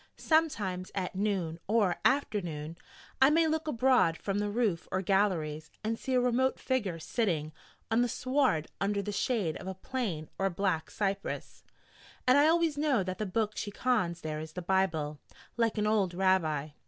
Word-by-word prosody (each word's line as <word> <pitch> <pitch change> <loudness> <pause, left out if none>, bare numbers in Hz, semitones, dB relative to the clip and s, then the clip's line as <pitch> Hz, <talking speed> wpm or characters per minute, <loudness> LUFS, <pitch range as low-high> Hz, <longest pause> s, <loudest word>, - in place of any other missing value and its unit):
Sometimes, 210 - 0
at 185 -2 -2
noon 185 -5 -1
or 205 -4 +2
afternoon, 170 - 0 0.5
I 265 - +8
may 325 +2 +4
look 315 0 -1
abroad 250 - +3
from 200 0 -2
the 205 0 -1
roof 205 -6 0
or 185 +1 0
galleries, 175 -6 0
and 225 +1 -2
see 260 - -1
a - - +5
remote 250 +1 +1
figure 215 -10 -1
sitting 160 -4 -1 0.4
on 225 +2 +4
the 245 - +1
sward 255 - +1
under 200 0 0
the 205 - -3
shade 200 -5 0
of 190 0 -7
plane 200 -13 -3
or 195 0 +2
black 175 -3 -1
cypress: 200 -1 -3 0.6
and 255 - +5
I 290 +2 +6
always 325 -2 +2
know 280 -9 +2
that 185 0 -5
the 215 - -1
book 215 +2 -1
she 205 - -3
cons 205 -7 0
there 155 -1 -4
is 155 0 -8
the 180 - -5
Bible 165 -6 0 0.4
like 230 -2 +1
an 210 - +1
old 205 -5 +1
Rabbi. 165 -6 +1
200 Hz, 170 wpm, -30 LUFS, 175-245 Hz, 0.6 s, I